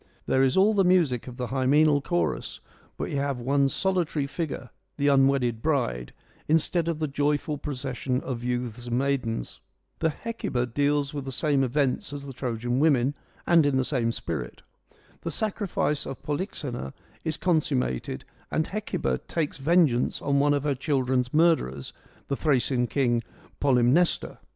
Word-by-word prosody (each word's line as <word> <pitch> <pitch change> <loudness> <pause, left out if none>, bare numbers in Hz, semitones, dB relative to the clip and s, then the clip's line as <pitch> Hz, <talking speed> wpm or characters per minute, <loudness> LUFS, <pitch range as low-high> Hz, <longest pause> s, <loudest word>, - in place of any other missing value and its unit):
There 130 - +2
is 135 +3 +3
all 205 +3 +5
the 200 -2 +3
music 170 -11 +2
of 125 -1 -8
the 125 - -2
hymeneal 145 +3 +3
chorus, 85 - -1 0.4
but - - -3
we - - -2
have 140 -2 -1
one 135 +3 +2
solitary 175 -4 0
figure 140 -3 -5
— - - -48
the 145 0 +2
unwedded 135 -4 +3
bride 120 - 0 0.2
— - - -31
instead 160 +2 +2
of 165 -2 0
the 155 0 -1
joyful 145 +1 0
procession 130 -2 -3
of 120 -3 -5
youths 120 -1 -3
and 120 0 0
maidens. 130 - -1 0.4
The 160 - +2
Hecuba 155 - -3
deals 145 +3 0
with 140 -2 -4
the 135 - -4
same 140 +1 +1
events 135 +1 0
as 140 -1 -6
the 135 - -7
Trojan 120 0 -2
Women 140 -3 +3 0.3
and 170 -2 +5
in 145 -2 +2
the 130 - +1
same 120 -5 0
spirit. - - -5 0.6
The - - -3
sacrifice 200 -8 -1
of 135 - -7
Polyxena 145 - -4 0.3
is 160 -2 -1
consummated 135 - 0 0.2
and 160 - 0
Hecuba 205 -2 -2
takes 155 -4 -2
vengeance 150 -4 +3
on 140 0 +1
one 145 +1 +3
of 145 - -1
her 145 -1 +1
children's 130 -2 0
murderers, 150 - +2 0.3
the 140 - -1
Thracian 130 -4 +1
king 120 -4 +1 0.4
Polymnestor. 135 +5 +2
140 Hz, 160 wpm, -26 LUFS, 125-155 Hz, 0.6 s, all